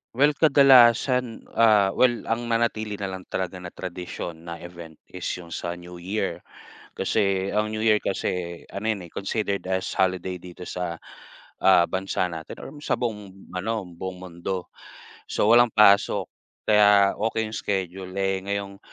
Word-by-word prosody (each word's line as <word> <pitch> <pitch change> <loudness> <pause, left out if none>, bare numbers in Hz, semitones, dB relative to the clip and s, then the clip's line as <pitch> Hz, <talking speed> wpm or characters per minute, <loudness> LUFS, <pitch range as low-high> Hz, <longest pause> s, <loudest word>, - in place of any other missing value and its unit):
Well, 145 +4 +5
kadalasan, 130 -4 +5 0.2
ah, 105 -4 +5
well, 120 +1 +2
ang 120 +1 -1
nanatili 115 -2 0
na 100 -1 -4
lang 95 -1 -8
talaga 95 0 -3
na 90 - -7
tradisyon, 85 -2 -7
na 85 - -5
event, 85 -2 -10 0.2
is 90 -1 -5
yung 85 -2 -11
sa 85 +1 -4
New 90 0 -11
Year. 95 +5 -3 0.6
Kasi 95 -1 +1
ang 105 +1 0
New 110 - -3
Year 110 -1 +4
kasi, 90 -3 -3
ano 110 +3 -2
'yon, 95 -5 -5
eh, - - -22
considered 100 0 -2
as 95 0 -1
holiday 95 -1 0
dito 90 0 -10
sa, 90 -2 -4 0.6
ah, 90 -3 +6
bansa 95 -1 -1
natin 80 -1 -8
or 145 - -9
sa - - +1
buong 105 -5 -5
ano, 105 +1 -2
buong 90 +1 -7
mundo, 90 +1 -5 0.6
so - - 0
walang 120 +1 +7
pasok. 100 -2 +5 0.4
Kaya 105 -2 +5
okey 110 +1 -1
yung 110 - -4
schedule. 95 -1 -3
Eh, 95 0 +1
ngayong 100 -1 -3
95 Hz, 155 wpm, -25 LUFS, 90-110 Hz, 0.6 s, walang